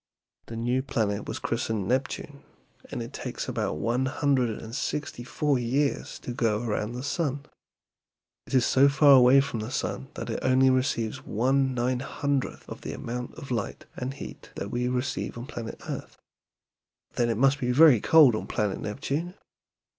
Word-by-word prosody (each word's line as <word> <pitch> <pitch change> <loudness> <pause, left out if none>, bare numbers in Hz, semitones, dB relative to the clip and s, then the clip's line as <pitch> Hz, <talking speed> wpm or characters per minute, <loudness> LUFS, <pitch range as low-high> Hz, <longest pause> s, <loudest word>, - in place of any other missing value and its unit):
The 115 - -7
new 120 +3 0
planet 110 -6 -1
was - - -3
christened 105 -4 -2
Neptune, 140 +3 -2 0.5
and - - -4
it - - -9
takes - - -5
about 75 - -2
one 120 +9 0
hundred 135 -3 +1
and 110 0 -9
sixty 145 -4 -3
four 140 +2 0
years 135 +4 -1
to 125 - -5
go 115 -2 0
around 110 0 -2
the 125 +1 -5
sun. 145 -1 -2 1.0
It - - -2
is 125 -2 +4
so 140 +2 +5
far 140 +1 +5
away 130 0 +8
from 135 -4 -4
the 110 +2 -4
sun 65 - -3
that - - -4
it - - -2
only 130 0 +4
receives 130 -1 0
one 130 +3 +1
nine 125 +1 0
hundredth 140 +1 -2
of - - -8
the - - -5
amount 125 +1 -5
of 135 - -9
light 115 -5 -3
and 130 +2 -4
heat - - -9 0.2
we 120 +3 -1
receive 125 0 -2
on 120 - -6
planet 120 -5 -7
earth." - - -6 1.0
"Then 120 -1 +1
it 115 - 0
must 135 +3 +3
be 125 -1 0
very 135 -4 +7
cold 155 -7 +7
on 110 - -3
planet 105 -2 -1
Neptune?" 145 - -3
125 Hz, 170 wpm, -27 LUFS, 115-140 Hz, 1.0 s, away